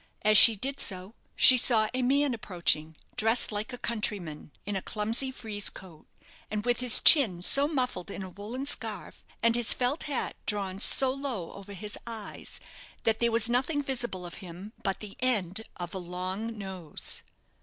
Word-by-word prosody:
As 215 0 +3
she 225 +2 +9
did 270 +7 -4
so, 185 +1 -5 0.2
she 255 - +9
saw 225 -3 +4
a 255 - -2
man 275 +2 +1
approaching, 170 -7 -2 0.2
dressed 225 +2 +4
like 210 +4 -5
a 245 - -7
countryman, 205 -11 -4 0.2
in 205 0 -4
a 190 - -3
clumsy 225 +7 -2
frieze 215 -5 -2
coat, 175 -5 -15 0.4
and 210 +1 -4
with 245 0 0
his 250 -2 +6
chin 210 - +6
so 280 +8 +5
muffled 250 - -3
in 200 - -7
a 190 - -8
woollen 215 +8 -7
scarf, 225 -8 -6 0.2
and 230 0 +3
his 240 -1 +1
felt 255 +5 -1
hat 280 - -2
drawn 195 -3 -2
so 260 +4 +4
low 265 -11 -6
over 200 0 -11
his 205 +2 -7
eyes, 225 -3 -8 0.4
that 225 -1 0
there 235 0 +1
was 230 0 +4
nothing 265 +5 -1
visible 240 -9 -5
of 175 - -9
him 185 +4 -11
but 195 -2 -3
the 210 -2 -9
end 215 -6 -1
of 175 -1 -7
a 190 - -4
long 185 +5 -5
nose. 190 -6 -6
215 Hz, 175 wpm, -27 LUFS, 190-245 Hz, 0.4 s, she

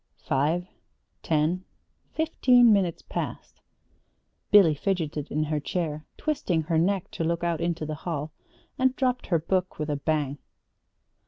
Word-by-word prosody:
Five, 155 +6 +1 0.6
ten, 160 +4 +1 0.5
fifteen 250 -7 +5
minutes 185 -4 0
passed. - - -6 0.9
Billy 195 -7 +7
fidgeted 155 -3 -2
in 155 +1 0
her 155 0 -1
chair, 155 -1 -3
twisted 185 - 0
her 160 0 +1
neck 190 +2 0
to - - -3
look 170 +1 -1
out 170 -2 0
into 170 -2 -1
the 155 - -4
hall 155 -3 -3 0.5
and 260 0 +3
dropped 255 -2 0
her 170 - +3
book 185 +3 -1
with 150 0 -2
a 145 - -1
bang. 145 -2 -1
170 Hz, 140 wpm, -26 LUFS, 155-190 Hz, 0.9 s, Billy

